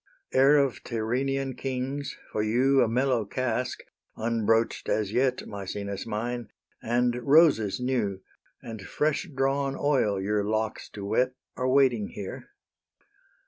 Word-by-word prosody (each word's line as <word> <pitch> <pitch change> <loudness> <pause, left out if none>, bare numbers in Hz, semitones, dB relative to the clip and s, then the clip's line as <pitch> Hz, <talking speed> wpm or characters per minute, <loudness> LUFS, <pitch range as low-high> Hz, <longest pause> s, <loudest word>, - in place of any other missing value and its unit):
Heir 135 +3 +6
of 140 -3 +1
Tyrrhenian 130 +4 -1
kings, 135 +2 -4
for 105 - -1
you 130 +5 +3
A 120 - +4
mellow 125 0 +1
cask, 125 +2 -2 0.3
unbroach'd 115 0 +1
as 105 -2 0
yet, 130 0 +1
Maecenas 100 0 -5
mine, 115 +1 -3 0.3
and 120 +1 +1
roses 140 - +4
new, 120 -7 -1 0.4
And 110 -2 -7
fresh 155 - -1
drawn 135 0 0
oil 130 -9 +2
your 105 +2 0
locks 110 +1 -2
to 100 -1 -6
wet, 125 +5 +1 0.2
Are 130 0 -1
waiting 130 -6 +3
here. 100 -2 -8
120 Hz, 125 wpm, -27 LUFS, 110-135 Hz, 0.4 s, Heir